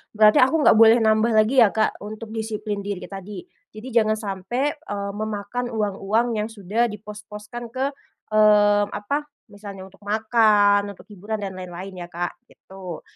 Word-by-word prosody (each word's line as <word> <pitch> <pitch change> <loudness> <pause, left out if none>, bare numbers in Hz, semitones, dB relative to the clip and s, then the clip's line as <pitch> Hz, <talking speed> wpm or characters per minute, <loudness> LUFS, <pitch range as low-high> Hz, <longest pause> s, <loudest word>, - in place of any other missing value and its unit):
berarti 215 0 +6
aku 265 +5 +4
nggak - - +6
boleh 225 +1 +8
nambah 220 +1 +3
lagi 220 +5 +4
ya, 225 - +7
Kak, 215 +2 0
untuk 215 +2 -8
disiplin 215 -2 -4
diri 200 -2 -5
tadi. 195 -1 -8 0.3
Jadi 215 +4 -10
jangan 215 -2 +3
sampai, 215 +7 -2
eee, 205 -11 -5
memakan 215 +3 -4
uang-uang 210 +1 0
yang 210 +1 -2
sudah 225 +2 -1
dipos-poskan 210 +2 -9
ke, 260 +3 -2 0.5
mmm, 205 -1 +5
apa, 285 +10 -3 0.3
misalnya 200 -2 -9
untuk 195 +1 -18
makan, 205 -1 +3
untuk - - -16
hiburan 210 +2 -5
dan 195 -1 -4
lain-lain 185 +1 -8
ya, - - -14
Kak, 175 0 -5
gitu. 185 -3 -10
210 Hz, 155 wpm, -23 LUFS, 200-220 Hz, 0.5 s, boleh